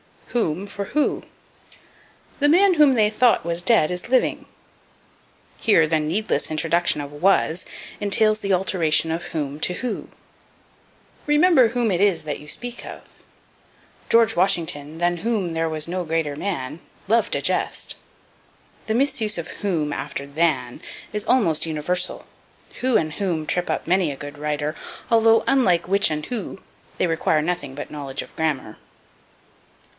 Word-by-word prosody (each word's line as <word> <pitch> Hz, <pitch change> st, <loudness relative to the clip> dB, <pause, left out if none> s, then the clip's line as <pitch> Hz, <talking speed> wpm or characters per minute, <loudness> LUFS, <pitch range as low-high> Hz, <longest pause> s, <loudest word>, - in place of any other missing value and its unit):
Whom 195 Hz, -6 st, -1 dB
for 200 Hz, 0 st, -5 dB
Who. 300 Hz, -, +1 dB, 1.2 s
"The 290 Hz, -, +4 dB
man 370 Hz, +3 st, +5 dB
whom 300 Hz, -4 st, +6 dB
they 215 Hz, -2 st, +4 dB
thought 230 Hz, -3 st, +3 dB
was 170 Hz, 0 st, -1 dB
dead 180 Hz, -5 st, +3 dB
is 180 Hz, 0 st, -4 dB
living." 255 Hz, 0 st, +1 dB, 1.1 s
Here 185 Hz, -8 st, +4 dB
the 155 Hz, 0 st, +1 dB
needless 170 Hz, +8 st, 0 dB
introduction 165 Hz, 0 st, +1 dB
of 140 Hz, 0 st, -7 dB
was 175 Hz, +1 st, +1 dB, 0.3 s
entails 215 Hz, +1 st, +2 dB
the 200 Hz, -2 st, 0 dB
alteration 165 Hz, -4 st, +1 dB
of 165 Hz, +1 st, -3 dB
whom 145 Hz, -2 st, -4 dB
to 180 Hz, -, 0 dB
who. 250 Hz, +6 st, -4 dB, 1.2 s
"Remember 295 Hz, -3 st, +5 dB
whom 235 Hz, -1 st, 0 dB
it 175 Hz, -, 0 dB
is 200 Hz, -3 st, +2 dB
that 150 Hz, -2 st, -4 dB
you 150 Hz, -, -13 dB
speak 245 Hz, +10 st, -6 dB
of." -, -, -8 dB, 1.1 s
"George 230 Hz, -2 st, +4 dB
Washington, 165 Hz, -5 st, 0 dB
than 175 Hz, 0 st, +1 dB
whom 200 Hz, -3 st, -1 dB
there 165 Hz, 0 st, 0 dB
was 155 Hz, 0 st, -1 dB
no 180 Hz, +1 st, -3 dB
greater 160 Hz, -2 st, -1 dB
man, 155 Hz, -5 st, -4 dB, 0.3 s
loved 230 Hz, 0 st, +2 dB
a -, -, -1 dB
jest." -, -, -2 dB, 0.9 s
The 220 Hz, -, 0 dB
misuse 245 Hz, -6 st, +1 dB
of 170 Hz, -, -5 dB
whom 165 Hz, -7 st, 0 dB
after 140 Hz, 0 st, -5 dB
than 140 Hz, -4 st, -1 dB, 0.3 s
is 210 Hz, -1 st, -2 dB
almost 195 Hz, -13 st, +2 dB
universal. 165 Hz, +4 st, -3 dB, 0.5 s
Who 255 Hz, -1 st, +1 dB
and 155 Hz, -1 st, +1 dB
whom 175 Hz, -6 st, -2 dB
trip 180 Hz, +3 st, -1 dB
up -, -, -2 dB
many 180 Hz, -2 st, +2 dB
a -, -, -6 dB
good 145 Hz, +2 st, -9 dB
writer, 150 Hz, +1 st, -2 dB, 0.4 s
although, 225 Hz, 0 st, +5 dB
unlike 185 Hz, -11 st, +2 dB
which 200 Hz, 0 st, +4 dB
and 150 Hz, -1 st, -3 dB
who, 220 Hz, -5 st, -5 dB, 0.4 s
they -, -, +3 dB
require 160 Hz, -2 st, +1 dB
nothing 150 Hz, -5 st, -3 dB
but 145 Hz, -, -7 dB
knowledge 140 Hz, -2 st, -4 dB
of -, -, -17 dB
grammar. 145 Hz, -9 st, -2 dB
175 Hz, 150 wpm, -22 LUFS, 155-215 Hz, 1.2 s, whom